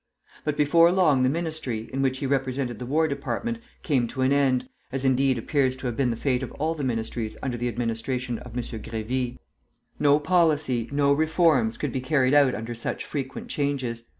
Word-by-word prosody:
But 150 -1 -1
before 165 +3 +5
long 165 -8 +4
the 130 - +4
Ministry, 155 -8 -3
in 135 - -1
which 130 -1 +1
he 140 - -3
represented 130 -3 -1
the 125 - -6
War 160 +4 +2
Department, 230 +10 -3 0.2
came 130 -7 +1
to 130 +2 -2
an 130 +2 +3
end, 135 -3 +2 0.2
as, 135 0 -2
indeed, 130 0 +3
appears 130 +2 +1
to 130 - -9
have 120 -2 -1
been 130 -1 +1
the 115 - -1
fate 125 +1 0
of 130 - -5
all 160 +2 -1
the 150 -3 -5
ministries 115 -2 -2
under 130 -2 -1
the 120 +1 -2
administration 120 +1 -2
of 125 -1 -9
M. 125 - -1
Grévy. 115 +3 -4 0.6
No 145 0 +5
policy, 150 -8 +2
no 140 0 +3
reforms, 155 -6 +2
could 145 - -2
be 130 - -2
carried 130 0 +2
out 140 -3 +5
under 115 +3 -5
such 115 - -4
frequent 135 -3 -5
changes. 135 -5 -2
130 Hz, 195 wpm, -25 LUFS, 120-145 Hz, 0.6 s, before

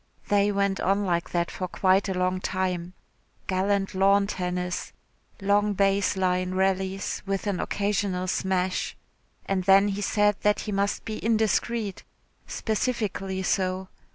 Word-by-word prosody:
They 205 0 +3
went 200 -1 0
on 200 +2 +1
like 170 -2 0
that 170 -1 -1
for 185 - -4
quite 190 +2 +2
a 190 - -1
long 185 0 0
time 185 -2 -2 0.5
gallant 195 +1 0
lawn 195 +1 +4
tennis 180 -2 -3 0.5
long 205 +1 +2
base 195 0 +2
line 185 0 0
rallies 190 0 0
with 195 0 -1
an 200 -3 -1
occasional 200 -2 -1
smash. 185 0 -1 0.5
And 190 -2 -1
then 195 +1 +6
he 200 +1 -3
said 205 0 +2
that 210 0 +2
he 215 - -4
must 200 0 -1
be 215 -1 -5
indiscreet 220 -1 0 0.4
specifically 210 -4 -2
so. 185 -1 0
195 Hz, 135 wpm, -26 LUFS, 185-205 Hz, 0.5 s, then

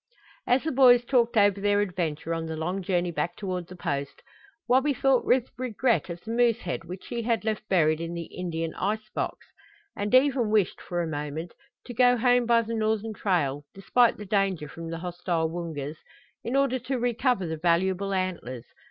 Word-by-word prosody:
As 250 +2 +3
the 320 - -1
boys 245 -2 +6
talked 235 -3 +2
over 200 -1 +4
their 205 0 +2
adventure 170 -5 -2
on 165 0 -3
the 160 0 -4
long 180 +5 -2
journey 175 -1 0
back 170 +2 -2
toward 185 -3 -4
the 185 - -10
Post, 140 -5 -4 0.4
Wabi 265 +3 +3
thought 270 -1 +3
with 250 -1 +2
regret 250 -3 0
of 170 0 -6
the 225 - -6
moose 235 -1 +2
head 170 -1 -4
which 180 +2 -8
he 235 - -2
had 230 -1 0
left 215 -1 -2
buried 155 -4 +3
in 170 +1 -4
the 170 - -4
"Indian 165 -2 -4
ice 215 +2 -2
box," - - -3 0.5
and 205 +4 0
even 260 -4 +3
wished, 210 -4 +1
for 175 -1 -2
a - - -3
moment, 150 +2 -5 0.3
to 245 - -7
go 245 +1 +4
home 245 0 +3
by 235 -1 +4
the 230 +1 -5
northern 220 0 -1
trail, 150 -9 0
despite 235 +5 +3
the 210 - -8
danger 195 -6 0
from 165 +2 -8
the 165 - -4
hostile 175 -1 -2
Woongas, 160 -3 -5 0.5
in 240 - -2
order 275 -2 +2
to 255 +2 -3
recover 245 -3 +1
the 160 -1 -3
valuable 185 +4 +1
antlers. 175 -11 -3
195 Hz, 190 wpm, -27 LUFS, 170-235 Hz, 0.5 s, boys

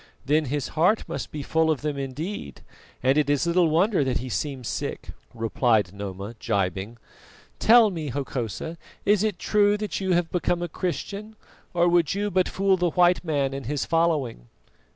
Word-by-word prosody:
"Then 150 +3 +2
his 145 0 -2
heart 180 +8 +2
must - - -5
be 150 -2 -5
full 160 +3 +1
of 155 -4 0
them 150 -1 -2
indeed, 140 - -5 0.4
and 135 +3 +4
it 145 -2 +1
is 145 +2 +2
little 170 -1 +3
wonder 175 +2 +3
that 130 -1 0
he 130 +1 -5
seems 130 +2 -3
sick," - - -4 0.2
replied 110 -4 +1
Noma, 100 +1 -6
gibing. 100 -1 -2 0.6
"Tell 225 -2 +6
me, 160 -5 -4
Hokosa, 135 - -4 0.3
is 205 -1 +4
it 215 -4 0
true 205 -1 +2
that 210 -1 -3
you 190 -1 +1
have 175 -1 +1
become 175 -1 0
a - - -2
Christian, 200 +5 -4 0.4
or 175 0 +2
would 175 -2 +3
you 205 +1 -1
but 185 0 +2
fool 195 0 +2
the 175 -1 +1
white 180 +2 +3
man 140 -5 0
and 135 -3 -6
his 145 0 -1
following?" 155 - 0
155 Hz, 175 wpm, -25 LUFS, 130-180 Hz, 0.6 s, Tell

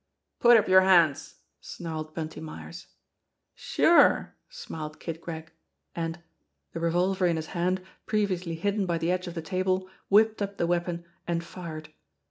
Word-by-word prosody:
"Put 240 -1 +7
up 215 - +2
your 185 0 +7
hands 170 -6 +3
!" - - -49
snarled 155 -2 -6
Bunty 160 -1 -5
Myers. 160 +2 -9 0.7
"Sure 340 - +4
!" - - -51
smiled 160 - -7
Kid 165 -1 -6
Gregg; 160 -2 -7 0.4
and 165 0 -3 0.5
the 165 - -4
revolver 180 +3 +1
in 170 - +1
his 160 -1 -3
hand 185 +1 0 0.2
previously 185 -6 -1
hidden 200 +3 -1
by 170 -1 0
the 165 +2 0
edge 185 0 -1
of 175 - -7
the 165 - -4
table 185 +1 -1 0.2
whipped 215 +1 +4
up 200 0 -3
the - - +1
weapon 170 0 -1 0.2
and 170 -1 -1
fired. 165 -3 -8
175 Hz, 160 wpm, -27 LUFS, 165-190 Hz, 0.7 s, Put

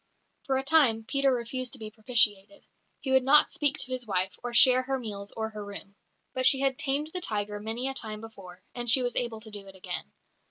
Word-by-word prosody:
For 265 -1 +1
a 265 - -2
time 270 -7 +3
Peter 275 +4 +1
refused 250 +1 -2
to - - -1
be 215 -1 -8
propitiated; 215 -3 +1 0.4
he 265 - -3
would 265 0 +5
not 275 +4 +5
speak 290 -1 +1
to 255 - -5
his 255 -2 -4
wife, 190 -1 0
or 245 - -5
share 255 +2 +6
her 265 +1 -2
meals 205 -4 -7
or 220 0 -2
her 210 -1 -7
room. 200 0 -10 0.4
But 255 0 +3
she 270 - +6
had 270 -2 0
"tamed 295 +1 0
the 365 - -4
tiger" 210 -6 -2
many 225 +5 -3
a 270 - -1
time 215 -5 -5
before, 190 -5 -12
and 240 -1 -3
she 255 +2 +5
was 245 -1 -2
able 235 -3 -2
to 220 -1 -10
do 205 -1 -8
it 195 - -13
again. 180 - -6
235 Hz, 230 wpm, -28 LUFS, 210-265 Hz, 0.4 s, share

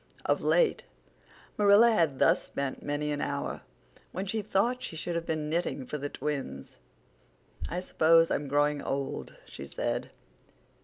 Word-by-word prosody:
Of - - +1
late - - +2 0.8
Marilla 205 +3 +7
had 165 -10 +2
thus - - +4
spent 140 -1 -4
many 145 +1 -2
an 145 - -2
hour, - - -3 0.5
when 190 +2 -4
she 215 +3 -1
thought 215 +5 0
she 165 - -6
should 170 +2 -3
have 170 0 -3
been 155 -2 -1
knitting 155 -4 -1
for 150 +4 -5
the 145 +1 -3
twins. 145 -2 -5 0.9
"I 180 +2 -2
suppose 165 -2 +4
I'm 145 - -1
growing 145 +1 +1
old," 135 0 -4
she - - -9
said. - - -3
160 Hz, 150 wpm, -29 LUFS, 145-195 Hz, 0.9 s, Marilla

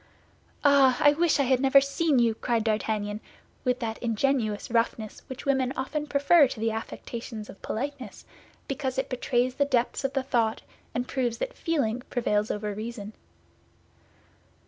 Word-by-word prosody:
"Ah! 275 -3 +5
I 290 - +6
wish 325 -1 +2
I - - +4
had 260 -1 +2
never 270 +1 +6
seen 280 +2 +1
you!" 235 -2 +3
cried 230 0 -1
D'Artagnan, 215 -1 -1 0.4
with 250 -1 +1
that 225 -1 -3
ingenuous 230 -2 0
roughness 230 -2 -1
which 260 0 -8
women 265 -2 +1
often 300 +3 -3
prefer 285 +2 +5
to 245 - -7
the 225 +1 0
affectations 225 0 -6
of 195 - -17
politeness, 275 +3 -5 0.4
because 265 -1 -3
it 265 - -1
betrays 250 0 0
the 285 +2 +1
depths 250 -2 0
of 270 0 -1
the 270 -2 0
thought 230 -4 0 0.3
and 245 +1 -1
proves 245 -4 -1
that - - -3
feeling 250 -8 -1
prevails 210 -3 0
over 210 0 -2
reason. 215 0 -6
250 Hz, 155 wpm, -27 LUFS, 225-275 Hz, 0.4 s, I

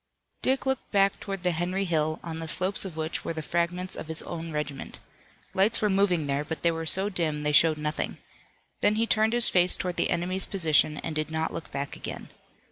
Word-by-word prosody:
Dick 265 +1 +1
looked 265 -1 -1
back 200 -1 +3
toward 195 -2 -5
the 180 - +3
Henry 180 +4 -1
Hill, 155 -2 0
on 165 -1 -5
the 165 - -5
slopes 185 +5 +2
of 175 -4 -7
which 160 0 -3
were - - -3
the 160 -1 -5
fragments 175 +3 -1
of - - -7
his 160 0 -3
own 165 -1 -6
regiment. 150 -2 -4 0.6
Lights 200 +4 +3
were 210 - +2
moving 190 -5 +2
there, 140 +1 -1
but 155 0 -6
they 170 - +4
were 165 0 -4
so 190 +4 +4
dim 160 -6 -1
they 150 - +1
showed 155 +1 +5
nothing. 150 0 -2 0.6
Then 210 - +4
he 225 +1 +2
turned 220 0 +2
his 240 -1 +5
face 180 0 +4
toward 180 -1 -3
the - - +1
enemy's 185 +2 0
position 155 -5 +2
and 160 - -4
did 155 0 -1
not 160 0 -2
look 160 - -6
back 140 +1 -4
again. - - -7
170 Hz, 215 wpm, -27 LUFS, 155-190 Hz, 0.6 s, showed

